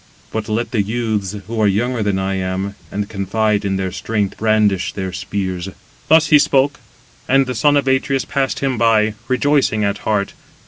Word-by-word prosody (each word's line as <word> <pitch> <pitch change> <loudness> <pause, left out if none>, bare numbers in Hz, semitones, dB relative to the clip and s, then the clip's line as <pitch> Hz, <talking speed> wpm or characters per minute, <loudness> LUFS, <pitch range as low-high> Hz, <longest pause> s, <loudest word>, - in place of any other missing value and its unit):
But 110 -1 -4
let 115 +2 -1
the 110 - +1
youths, 105 -2 -2
who 110 +2 -3
are 105 - +4
younger 115 +4 0
than 100 -2 0
I 95 0 -1
am, 95 +1 -2 0.2
and 100 0 -3
confide 105 +1 0
in 100 -1 -1
their 95 -1 -2
strength, 105 0 -2
brandish 105 -3 +1
their 95 -2 -4
spears." 95 -1 -3 0.4
Thus 160 0 +5
he 150 - +7
spoke; 140 +1 +2 0.5
and 135 +1 +4
the 125 - -3
son 145 +5 +3
of 140 - 0
Atreus 135 0 +1
passed 135 -1 -1
him 135 -4 -1
by, 110 -2 +3
rejoicing 130 -4 +2
at 100 -1 -1
heart. 105 -2 -1
110 Hz, 180 wpm, -18 LUFS, 100-125 Hz, 0.5 s, he